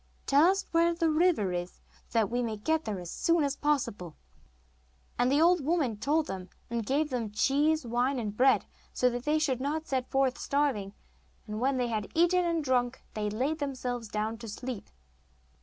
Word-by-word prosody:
Tell 290 +5 +5
us 390 0 0
where 335 0 +3
the 330 -2 +1
river 310 - +2
is, 175 0 -5 0.3
so - - -3
that 220 -1 +2
we 245 +1 0
may 225 -3 -2
get 315 +9 0
there 205 -3 -3
as 175 -1 -7
soon 335 -2 +2
as 280 0 0
possible.' 225 - -1 1.0
And 245 +1 +3
the 285 - +3
old 345 -1 +4
woman 295 -7 +1
told 300 +7 +1
them, 190 -5 -6 0.2
and 235 -1 -1
gave 290 +7 0
them 245 -3 -1
some - - -11
cheese, 295 +5 +2
wine, 245 +3 0
and 215 -4 -3
bread, 260 +4 +4 0.3
so 250 0 +2
that 245 +1 -5
they 300 +1 +2
should 270 -5 0
not 305 +3 -2
set 260 -3 -2
forth 270 -1 +1
starving; 270 -9 0 0.5
and 210 -1 -5
when 265 +2 +1
they 245 -1 0
had 215 -3 -3
eaten 350 +2 +4
and 335 -2 0
drunk 250 -1 0
they 210 -1 -2
laid 265 +9 -1
themselves 250 -4 -3
down 215 +2 -3
to 230 - -8
sleep. 240 +1 -6
260 Hz, 195 wpm, -29 LUFS, 225-310 Hz, 1.0 s, Tell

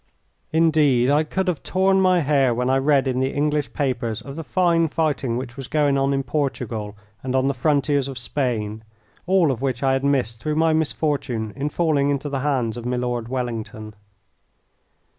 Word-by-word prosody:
Indeed, 150 -6 +3
I 150 +2 +3
could 190 +5 -2
have 180 -5 -1
torn 190 +1 +2
my 185 -2 +4
hair 135 -4 +2
when 125 +2 0
I 135 - +3
read 140 -1 +2
in 130 -1 0
the 130 0 +1
English 150 0 0
papers 125 -6 -2
of 140 -1 -9
the 165 - -5
fine 170 -2 +2
fighting 145 -6 -1
which 125 -1 -6
was 135 -2 -7
going 145 -2 +2
on 135 0 +1
in 135 0 0
Portugal 115 -8 -3 0.2
and 130 0 -3
on 130 0 +2
the 140 - +1
frontiers 140 0 +1
of 135 -2 -7
Spain, 115 -4 -2 0.4
all 180 -5 +4
of 125 -2 -4
which 135 0 -2
I 135 -1 +3
had 135 0 0
missed 130 -5 0
through 150 +5 -2
my 160 0 +3
misfortune 145 -8 -1
in 145 +2 -2
falling 150 -3 +1
into 145 +1 -1
the 140 -1 -2
hands 130 -5 -1
of 120 - -7
Milord 125 -2 -2
Wellington. 115 -4 -5
135 Hz, 185 wpm, -22 LUFS, 125-150 Hz, 0.4 s, my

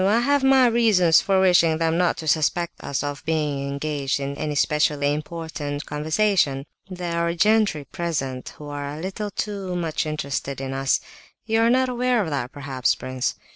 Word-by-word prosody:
I 220 +4 +3
have 285 +2 +2
my 265 -1 +6
reasons 215 -9 +4
for 195 -1 +2
wishing 175 -4 +4
them 165 0 +1
not 175 0 +2
to 160 - -6
suspect 160 +2 0
us 140 0 -2
of 145 0 -4
being 150 -3 -1
engaged 140 -1 -2
in 140 0 -4
any 150 0 -3
specially 145 0 +2
important 150 -2 -5
conversation. 150 -2 +1 0.2
There 175 -2 -3
are 170 0 0
gentry 210 -5 +2
present 135 -5 -3
who 150 - -10
are 145 0 -5
a - - -8
little 195 +4 -4
too 195 -2 -4
much 165 -2 -2
interested 140 -2 -3
in 135 0 -4
us. 135 0 +1 0.4
You 225 0 +1
are 230 - +4
not 260 +1 +3
aware 250 0 +1
of 175 -7 -1
that 125 -4 -2
perhaps, 135 -3 -1
prince? 130 -1 -3
160 Hz, 175 wpm, -23 LUFS, 145-195 Hz, 0.4 s, my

